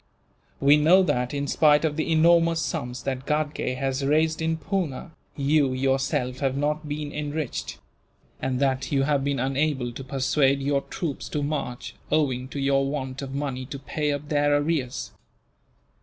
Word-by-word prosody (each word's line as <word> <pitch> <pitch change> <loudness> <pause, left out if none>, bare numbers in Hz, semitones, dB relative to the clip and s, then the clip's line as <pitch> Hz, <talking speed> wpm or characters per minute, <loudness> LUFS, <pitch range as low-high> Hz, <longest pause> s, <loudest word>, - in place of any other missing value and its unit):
We 140 +2 +6
know 170 +6 +6
that, 125 -7 0
in 145 0 -2
spite 150 +1 +4
of 150 -2 0
the 160 +1 -1
enormous 165 +1 +4
sums 135 -7 -3
that 130 -1 -3
Ghatgay 150 -3 -1
has 135 +1 -2
raised 155 +3 +2
in 160 0 0
Poona, 165 -2 -3 0.3
you 140 -1 +2
yourself 130 -1 0
have 135 -1 0
not 150 +1 -1
been 145 0 -4
enriched; 150 -2 -4 0.6
and 130 -1 -1
that 135 -1 0
you 135 -2 +2
have 140 -1 +1
been 140 0 0
unable 135 -1 0
to 125 +3 -8
persuade 135 +1 +1
your 140 0 +1
troops 155 -2 -5
to 150 - -2
march, 140 -4 -3 0.2
owing 130 -5 +1
to 140 - -6
your 135 0 +2
want 135 -2 -4
of 135 0 -6
money 135 -3 -3
to 140 - -6
pay 150 +2 -2
up 145 +1 -4
their 145 -1 +3
arrears. 145 -4 -2
140 Hz, 165 wpm, -25 LUFS, 135-150 Hz, 0.6 s, We